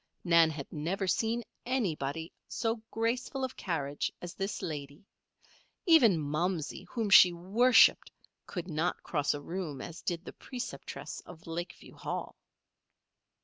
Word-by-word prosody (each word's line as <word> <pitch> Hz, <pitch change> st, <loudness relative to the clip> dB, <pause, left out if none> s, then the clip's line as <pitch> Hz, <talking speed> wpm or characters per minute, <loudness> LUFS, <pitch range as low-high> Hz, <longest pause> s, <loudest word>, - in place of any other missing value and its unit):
Nan 170 Hz, -2 st, +6 dB
had 145 Hz, -3 st, -5 dB
never 175 Hz, +6 st, -1 dB
seen 225 Hz, +6 st, +1 dB, 0.2 s
anybody 165 Hz, -, -2 dB, 0.2 s
so 225 Hz, -1 st, -1 dB
graceful 245 Hz, +4 st, -1 dB
of 260 Hz, 0 st, -3 dB
carriage 145 Hz, -6 st, -2 dB
as 175 Hz, 0 st, -7 dB
this 195 Hz, +2 st, -3 dB
lady. 145 Hz, +3 st, -6 dB, 0.8 s
Even 270 Hz, -, +6 dB
"Momsey," 155 Hz, +2 st, -2 dB
whom 225 Hz, -4 st, -2 dB
she 180 Hz, -2 st, +10 dB
worshipped, 205 Hz, +9 st, +5 dB, 0.4 s
could 175 Hz, -2 st, -5 dB
not 165 Hz, 0 st, -1 dB
cross 145 Hz, -3 st, 0 dB
a 145 Hz, -, -6 dB
room 165 Hz, -3 st, -4 dB
as 170 Hz, -, -7 dB
did 175 Hz, 0 st, -3 dB
the -, -, -8 dB
preceptress 250 Hz, -2 st, -6 dB
of 165 Hz, -2 st, -12 dB
Lakeview 170 Hz, +2 st, -6 dB
Hall. -, -, -5 dB
175 Hz, 130 wpm, -31 LUFS, 160-225 Hz, 0.8 s, she